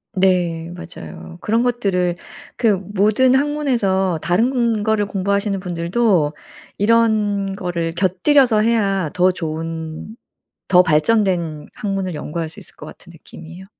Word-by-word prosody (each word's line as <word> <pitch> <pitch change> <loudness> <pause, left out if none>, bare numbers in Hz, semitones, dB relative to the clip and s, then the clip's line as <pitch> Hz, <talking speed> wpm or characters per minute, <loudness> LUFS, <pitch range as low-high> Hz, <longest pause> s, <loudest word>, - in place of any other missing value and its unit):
네 175 -3 +1
맞아요. 80 - -10
그런 225 +3 +1
것들을 190 -8 0 0.4
그 230 - +1
모든 205 +6 +2
학문에서 240 - +1
다른 230 +3 +1
거를 215 -2 +1
공부하시는 200 0 -1
분들도 175 -2 0 0.4
이런 210 -3 +2
거를 170 -3 -3
곁들여서 215 - +3
해야 200 -7 +1
더 180 +1 +3
좋은 160 +3 -5 0.5
더 180 -1 +6
발전된 170 -2 +1
학문을 195 -3 -3
연구할 160 +2 -4
수 - - -13
있을 - - -15
것 - - -11
같은 175 - -13
느낌이에요. 170 +2 -12
190 Hz, 270 characters per minute, -19 LUFS, 170-215 Hz, 0.5 s, 더